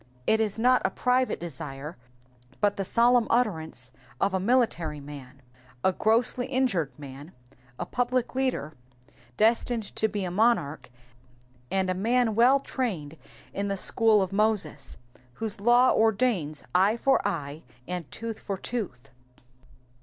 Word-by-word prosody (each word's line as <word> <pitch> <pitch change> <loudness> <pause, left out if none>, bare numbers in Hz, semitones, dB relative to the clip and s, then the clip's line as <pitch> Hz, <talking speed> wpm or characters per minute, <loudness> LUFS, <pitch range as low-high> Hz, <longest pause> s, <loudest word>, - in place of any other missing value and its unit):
It 220 - +3
is 215 -2 -1
not 250 +3 +4
a - - +2
private 255 0 0
desire, 150 -2 -7 0.6
but 205 -1 +2
the 195 - -2
solemn 235 +4 +3
utterance 160 - -1 0.3
of 195 - +1
a 190 - +1
military 190 - +1
man, 140 -2 -11 0.4
a 190 - +3
grossly 230 +5 +1
injured 250 - 0
man, 145 +3 -10 0.4
a - - -3
public 245 0 -1
leader 255 - -1 0.6
destined 230 +1 +2
to 220 - +2
be 205 -2 -3
a 180 - -4
monarch, 180 - +1 0.8
and 190 -1 0
a 185 - +1
man 230 +4 +1
well 245 +5 +5
trained 190 - -4 0.4
in 200 0 -2
the 200 0 -2
school 215 +1 +3
of 190 +1 -5
Moses, 195 -9 0 0.4
whose 215 - -2
law 240 +3 +5
ordains 210 - +1
eye 195 +5 +3
for 270 +3 +2
eye, 155 -6 -3 0.3
and 175 -3 -5
tooth 225 -1 -6
for 195 -2 -4
tooth. 175 - -5
205 Hz, 140 wpm, -27 LUFS, 160-240 Hz, 0.8 s, well